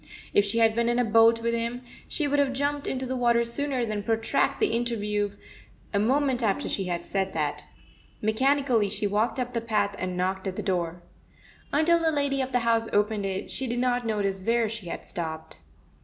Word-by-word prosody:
If 205 - +4
she 210 +3 -2
had 225 -1 +4
been 235 +1 +1
in 240 - +1
a 245 - +2
boat 230 +1 +5
with 235 0 +1
him, 235 +2 -2 0.2
she 300 - 0
would 290 0 +1
have 275 -2 +2
jumped 285 +1 -1
into 260 0 -2
the 260 +1 -3
water 235 -1 +3
sooner 260 +1 -1
than 215 -2 -3
protract 225 +1 0
the 425 - +2
inter 235 0 0
view 205 -1 -1 0.6
a 200 - +2
moment 260 +3 +2
after 210 -4 0
she 195 - -1
had 175 -1 -3
said 190 -1 -1
that. 150 -2 -2 0.5
Mechanically 245 0 +2
she 205 - -2
walked 210 +5 0
up 250 0 -3
the 230 - -1
path 210 -3 0
and 185 -1 -3
knocked 190 +2 -1
at 185 - -3
the 210 - -4
door. 175 -3 -2 0.7
Until 325 +4 +4
the 325 -1 +2
lady 285 -2 0
of 260 0 -3
the 245 -1 +1
house 230 -1 +2
opened 205 -1 +1
it, 190 0 -4
she 265 - -1
did 240 +1 -2
not 245 0 +1
notice 200 -4 -1
where 230 +3 +2
she 215 -4 -6
had - - -6
stopped. 160 -2 -6
230 Hz, 210 wpm, -26 LUFS, 200-250 Hz, 0.7 s, boat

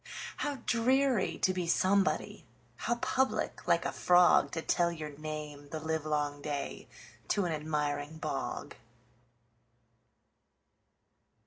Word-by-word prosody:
How 290 - -1
dreary 255 -1 +2
to 185 - +4
be 180 -2 -2
somebody! 190 +3 +1 0.3
How 240 - -1
public, 260 +2 -1
like - - +3
a - - +1
frogTo 175 -2 +4
tell 170 -1 +2
your 155 -3 -6
name 150 -1 -7
the 155 - -4
livelong 150 -2 -1
dayTo 150 +6 -4
an 175 - -1
admiring 150 -1 -2
bog! - - -4
160 Hz, 100 wpm, -31 LUFS, 150-185 Hz, 0.3 s, to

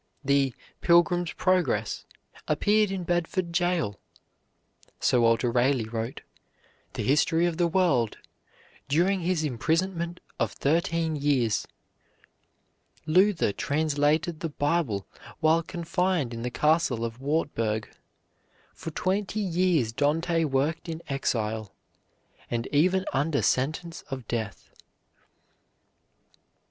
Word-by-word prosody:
The 140 -2 +2 0.3
"Pilgrim's 175 0 +3
Progress" 185 -1 0 0.4
appeared 210 0 +3
in 190 -2 -3
Bedford 175 +1 -1
Jail, 170 - 0 1.0
Sir 125 - +3
Walter 115 +1 +3
Raleigh 125 -1 +2
wrote 115 +2 -4 0.7
"The - - -3
History 160 +4 +3
of 170 -2 -1
the 175 -1 +3
World" 165 - +2 0.7
during 175 +7 +2
his 175 -2 0
imprisonment 170 +6 -1 0.2
of - - 0
thirteen 165 +1 0
years. 135 -7 +1 1.4
Luther 180 - +3
translated 155 - 0
the 165 - -3
Bible 145 - 0 0.3
while 160 +1 +4
confined 175 -5 -1
in 115 - -5
the 125 - -2
Castle 150 -3 +1
of 115 +1 -6
Wartburg. 115 -8 -1 0.9
For - - -7
twenty 190 +5 -1
years 175 - +1
Dante 165 +5 +1
worked 150 +4 -1
in 165 0 -5
exile, 110 -6 -2 0.7
and 115 -1 -2
even 185 +6 +3
under 140 +2 +1
sentence 160 +6 -1
of 130 -5 -6
death. 110 -6 -4
155 Hz, 105 wpm, -27 LUFS, 130-175 Hz, 1.4 s, while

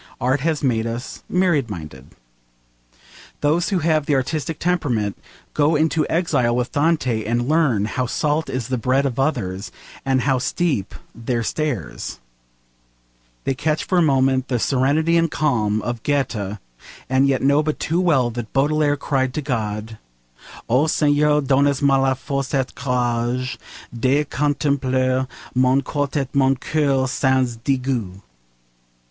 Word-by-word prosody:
Art 130 +4 +1
has 155 +1 -1
made 115 -4 +1
us 115 +2 -6
myriad 175 -9 +2
minded. 75 -9 -8 1.3
Those 160 +4 +2
who 195 - +1
have 155 -3 +2
the 145 - +2
artistic 155 +4 -2
temperament 130 - 0 0.4
go 150 +2 +2
into 155 0 +1
exile 130 -8 +1
with 125 0 -1
Dante 145 -7 +1
and 120 +3 -1
learn 145 -10 +2
how 125 +3 -2
salt 150 +5 -1
is 130 -2 -3
the 130 -2 -1
bread 130 +4 +1
of 135 -2 -2
others, 110 -9 -1 0.3
and 135 -1 +1
how 130 0 +1
steep 140 - -1 0.2
their 115 0 -2
stairs; 130 - -3 1.2
they 135 - 0
catch 155 +3 -1
for 185 - +1
a - - +4
moment 135 -3 +2
the 125 - 0
serenity 145 +7 +2
and 165 0 +2
calm 110 -9 0
of 120 -2 -3
Goethe, 115 -8 -1 0.5
and 130 +1 +3
yet 135 -2 +1
know 140 +2 +4
but 155 0 -2
too 170 +3 0
well 135 -9 +2
that 115 -1 -6
Baudelaire 145 +1 +2
cried 130 -2 -1
to 155 - -1
God 110 -4 -3 0.7
'O 130 +6 +3
Seigneur, 150 -1 +3
donnez 140 +1 +2
moi 135 -1 +4
la 135 0 +2
force 140 +1 -3
et 135 -2 +1
le - - -18
courage 125 -1 -1 0.4
De 135 +5 +2
contempler 130 -3 0 0.3
mon 130 +1 +3
corps 145 -1 -2
et 135 -3 -2
mon 135 -1 +3
coeur 135 -1 0
sans 130 -2 +1
degout.' 120 -6 -2
135 Hz, 145 wpm, -21 LUFS, 120-150 Hz, 1.3 s, a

